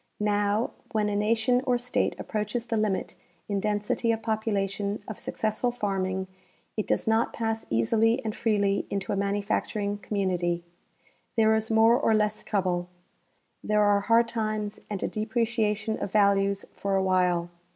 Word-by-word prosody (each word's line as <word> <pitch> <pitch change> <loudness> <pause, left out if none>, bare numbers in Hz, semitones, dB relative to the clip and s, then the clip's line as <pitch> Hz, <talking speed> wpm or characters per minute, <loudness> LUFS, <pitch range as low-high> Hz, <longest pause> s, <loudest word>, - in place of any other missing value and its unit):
Now, 205 +1 +1 0.2
Avhen 210 -1 +2
a - - -1
nation 225 +4 +2
or 250 -1 +3
state 245 +1 0
approaches 215 +2 -3
the 230 - -2
limit 215 -3 -1 0.3
in 200 -1 -1
density 210 +3 0
of 225 0 -2
population 205 -2 -1
of 215 - -6
successful 220 +3 -1
farming 190 -4 -2 0.5
it 215 - -2
does - - 0
not 225 +1 +2
pass 225 -1 -2
easily 225 - +2
and 215 - -2
freely 200 -3 +1
into 200 +1 -2
a - - +1
manufacturing 200 +1 -1
community. 180 -4 -1 0.7
There 220 -1 +5
is 220 0 0
more 225 +2 +5
or 225 -6 +3
less 210 0 0
trouble. 180 -3 -1 0.7
There 210 0 +2
are 205 -1 +4
hard 230 +3 +3
times 215 -2 -2
and 205 -3 -3
a - - +1
depreciation 220 -1 -1
of 195 - -3
values 200 -1 +3
for 200 -1 -1
a 190 - +2
while. 180 -2 +2
210 Hz, 150 wpm, -27 LUFS, 200-225 Hz, 0.7 s, There